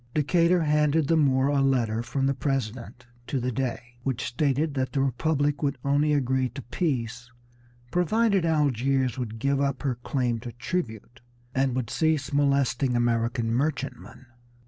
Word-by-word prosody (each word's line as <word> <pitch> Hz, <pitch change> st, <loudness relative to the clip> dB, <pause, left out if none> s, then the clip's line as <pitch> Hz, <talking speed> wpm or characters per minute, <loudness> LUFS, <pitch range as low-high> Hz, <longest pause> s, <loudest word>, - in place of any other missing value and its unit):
Decatur 170 Hz, +3 st, +3 dB
handed 150 Hz, 0 st, +2 dB
the 165 Hz, -, +3 dB
Moor 135 Hz, -3 st, +3 dB
a 145 Hz, -1 st, +2 dB
letter 120 Hz, -5 st, +1 dB
from 135 Hz, +3 st, -2 dB
the 140 Hz, -, +2 dB
President 125 Hz, -3 st, -3 dB, 0.2 s
to 135 Hz, -, -1 dB
the 125 Hz, +1 st, -1 dB
Dey, 125 Hz, -1 st, -4 dB
which 130 Hz, -2 st, -2 dB
stated 145 Hz, +3 st, 0 dB
that 130 Hz, -2 st, -2 dB
the 140 Hz, -, 0 dB
Republic 145 Hz, +2 st, 0 dB
would 140 Hz, -2 st, 0 dB
only 145 Hz, +2 st, +2 dB
agree 130 Hz, -2 st, +1 dB
to 130 Hz, +2 st, -8 dB
peace 120 Hz, -4 st, -3 dB, 0.6 s
provided 200 Hz, +2 st, +2 dB
Algiers 135 Hz, -5 st, +1 dB
would 115 Hz, -3 st, -4 dB
give 140 Hz, +4 st, 0 dB
up 140 Hz, -1 st, -1 dB
her 135 Hz, -3 st, +1 dB
claim 125 Hz, -5 st, -1 dB
to 120 Hz, 0 st, -8 dB
tribute 120 Hz, -, -4 dB, 0.3 s
and 130 Hz, -1 st, +1 dB
would 125 Hz, -3 st, -2 dB
cease 155 Hz, -3 st, 0 dB
molesting 140 Hz, -3 st, +2 dB
American 115 Hz, 0 st, 0 dB
merchantmen. 135 Hz, -2 st, -3 dB
135 Hz, 150 wpm, -26 LUFS, 120-145 Hz, 0.6 s, Decatur